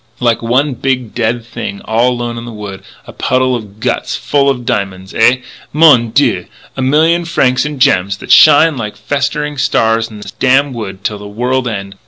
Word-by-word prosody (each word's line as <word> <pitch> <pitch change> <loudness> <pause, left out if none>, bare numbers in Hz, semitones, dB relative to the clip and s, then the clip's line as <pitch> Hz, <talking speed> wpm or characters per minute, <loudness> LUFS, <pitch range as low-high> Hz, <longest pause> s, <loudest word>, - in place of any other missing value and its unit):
like 120 -2 +1
one 130 +5 +1
big 125 -2 -2
dead 115 0 -1
thing 100 -3 -6
all 115 +3 +2
alone 120 -1 -4
in 115 - -7
the 120 - -8
wood.... 105 -3 -8 0.2
A - - -12
puddle 130 0 0
of 105 -3 -8
guts - - -2
full 140 -1 +1
of 125 -3 -2
diamonds! 95 -3 -3
Ah! 125 - +5 0.4
mon 145 -7 +5
dieu! - - +1 0.3
a 135 - -4
million 160 +6 +2
francs 135 -6 +1
in 150 -1 -4
gems 100 -7 +2
that - - -6
shine 155 +1 +6
like 105 -3 -5
festering 145 +1 -2
stars 115 -4 +1
in 105 -2 -11
this 100 -1 -9
damn 130 +4 +2
wood 100 -5 -7
till 105 -1 -3
the 105 - -9
world 125 +4 -1
end. 100 -3 -5
120 Hz, 190 wpm, -13 LUFS, 110-135 Hz, 0.4 s, shine